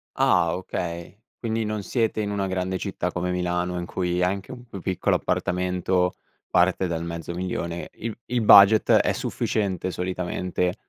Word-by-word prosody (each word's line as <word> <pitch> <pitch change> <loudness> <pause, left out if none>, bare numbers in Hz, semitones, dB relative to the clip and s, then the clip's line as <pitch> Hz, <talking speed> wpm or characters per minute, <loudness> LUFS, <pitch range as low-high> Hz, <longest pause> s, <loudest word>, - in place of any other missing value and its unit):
Ah, 85 +1 +3
okay. 85 0 -5 0.2
Quindi 115 -1 -1
non 105 -1 -3
siete 115 -2 0
in 105 -1 -1
una 100 -1 -1
grande 95 0 -2
città 90 -3 -3
come 90 0 -1
Milano, 90 0 -1
in 85 - -4
cui 90 -1 -1
anche 95 +4 -1
un 125 -1 -10
più 100 -6 -9
piccolo 95 -2 0
appartamento 90 0 0 0.3
parte 95 +1 +3
dal 85 -1 -3
mezzo 85 0 -5
1000000, 85 -1 -4
il 115 0 -6
il 120 -1 -1
budget 105 0 +7
è - - +4
sufficiente 95 -4 -2
solitamente 90 0 -2
90 Hz, 155 wpm, -25 LUFS, 90-100 Hz, 0.3 s, budget